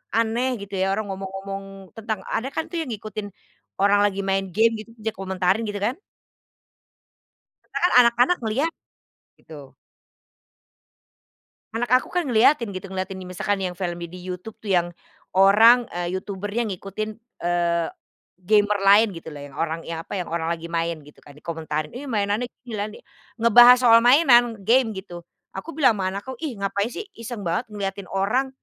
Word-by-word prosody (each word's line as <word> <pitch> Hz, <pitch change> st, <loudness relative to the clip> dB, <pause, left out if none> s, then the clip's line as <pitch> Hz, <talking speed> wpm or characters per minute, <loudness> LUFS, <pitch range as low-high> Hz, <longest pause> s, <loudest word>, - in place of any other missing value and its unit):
aneh 235 Hz, +3 st, +1 dB
gitu 200 Hz, 0 st, -12 dB
ya 190 Hz, -, +2 dB
orang 215 Hz, -, -3 dB
ngomong-ngomong 195 Hz, +1 st, -6 dB, 0.3 s
tentang 220 Hz, -2 st, -3 dB
ada 225 Hz, +4 st, -2 dB
kan 320 Hz, -, 0 dB
tuh 340 Hz, -, -2 dB
yang 310 Hz, -, -5 dB
ngikutin 215 Hz, -1 st, -6 dB, 0.5 s
orang 200 Hz, +1 st, +4 dB
lagi 195 Hz, -1 st, -4 dB
main 195 Hz, 0 st, 0 dB
game 225 Hz, +1 st, +4 dB
gitu, 215 Hz, -, -10 dB
bisa 220 Hz, +1 st, -2 dB
komentarin 190 Hz, +2 st, 0 dB
gitu 205 Hz, -1 st, -4 dB
kan. 245 Hz, -, -1 dB, 1.7 s
Sekarang 355 Hz, -, 0 dB
anak-anak 245 Hz, +8 st, +3 dB
ngeliat, 260 Hz, +9 st, 0 dB, 0.7 s
gitu. 145 Hz, -4 st, -12 dB, 2.0 s
Anak 240 Hz, +2 st, -2 dB
aku -, -, -13 dB
kan 355 Hz, -2 st, -1 dB
ngeliatin 235 Hz, -2 st, +3 dB
gitu, 185 Hz, +1 st, -7 dB
ngeliatin 190 Hz, 0 st, -4 dB
nih 180 Hz, -, -9 dB
misalkan 195 Hz, +2 st, -2 dB
yang 180 Hz, -2 st, -3 dB
film 175 Hz, -2 st, -4 dB
di 170 Hz, -, -6 dB
di 180 Hz, -, -10 dB
YouTube 185 Hz, +4 st, -7 dB
tuh 205 Hz, -3 st, -3 dB
yang 175 Hz, -1 st, +3 dB, 0.5 s
orang, 225 Hz, +5 st, +7 dB
eee, 175 Hz, +1 st, -2 dB
YouTuber-nya 205 Hz, +4 st, -3 dB
ngikutin, 200 Hz, +1 st, -5 dB, 0.4 s
eee, 170 Hz, -1 st, +1 dB, 0.5 s
gamer 205 Hz, +2 st, +3 dB
lain 200 Hz, +3 st, +6 dB
gitu 165 Hz, -1 st, -9 dB
loh 145 Hz, -, -8 dB
yang 140 Hz, -, -13 dB
orang 165 Hz, 0 st, -2 dB
yang 165 Hz, -1 st, -5 dB
apa, 195 Hz, -, -6 dB
yang 180 Hz, -, -3 dB
orang 165 Hz, -1 st, -1 dB
lagi 170 Hz, -1 st, -3 dB
main 170 Hz, 0 st, -2 dB
gitu 150 Hz, -, -18 dB
kan, 145 Hz, -, -16 dB
dikomentarin 155 Hz, -1 st, -4 dB
"Ih 270 Hz, +3 st, -7 dB
mainannya 210 Hz, +2 st, -1 dB, 0.2 s
gini 240 Hz, -, -8 dB
lah 205 Hz, -1 st, -2 dB
nih," 215 Hz, -, -13 dB, 0.3 s
ngebahas 240 Hz, +2 st, +8 dB
soal 230 Hz, -1 st, +8 dB
mainan, 240 Hz, -3 st, +5 dB
game 245 Hz, +1 st, +4 dB
gitu. 180 Hz, -3 st, -8 dB, 0.3 s
Aku 195 Hz, -, -7 dB
bilang 260 Hz, -6 st, +5 dB
ama 185 Hz, -, 0 dB
anakku 200 Hz, +7 st, -6 dB
ih 285 Hz, -9 st, -4 dB
ngapain 200 Hz, +2 st, -1 dB
sih 410 Hz, -, -6 dB
iseng 230 Hz, -3 st, -7 dB
banget 175 Hz, +8 st, -1 dB
ngeliatin 200 Hz, -2 st, -5 dB
orang, 215 Hz, +8 st, 0 dB
200 Hz, 170 wpm, -23 LUFS, 185-230 Hz, 2.0 s, ngebahas